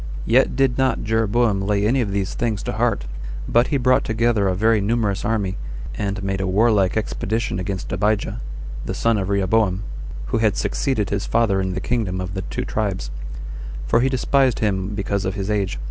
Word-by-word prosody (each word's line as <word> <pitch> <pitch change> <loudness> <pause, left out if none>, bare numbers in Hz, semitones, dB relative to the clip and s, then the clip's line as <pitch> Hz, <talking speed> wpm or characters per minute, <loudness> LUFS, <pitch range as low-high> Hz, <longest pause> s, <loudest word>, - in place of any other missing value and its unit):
2. - - -4
Yet 130 +2 +4
did 135 -1 +2
not 130 -3 +2
Jeroboam 110 -1 +2
lay 100 +1 +1
any 125 +5 +3
of 110 - -1
these 100 -1 -1
things 110 -4 -1
to - - -2
heart, - - 0 0.4
but 120 +2 +4
he 140 - +1
brought 130 0 +3
together 110 -2 +1
a 95 - +1
very 110 +2 +3
numerous 105 -1 0
army, 100 -4 0 0.4
and 100 0 -3
made 95 0 -1
a 95 - -1
warlike 100 0 +3
expedition 110 -1 -1
against 95 0 -4
Abijah, 105 - 0 0.4
the - - -3
son 115 -2 +2
of 95 0 -2
Rehoboam, 100 0 +2 0.5
who 115 - +3
had 110 -2 +2
succeeded 120 -8 0
his 100 0 -1
father 110 -4 +2
in 95 -1 -2
the - - -1
kingdom 100 -4 -1
of 90 0 -4
the 95 - -2
two - - -4
tribes; 95 - -2 0.7
for 115 - +3
he 130 +2 +3
despised 130 -1 +2
him 100 -1 -1
because 100 0 -1
of 95 - -2
his 100 +1 -2
age. 100 -8 0
105 Hz, 190 wpm, -22 LUFS, 95-115 Hz, 0.7 s, Yet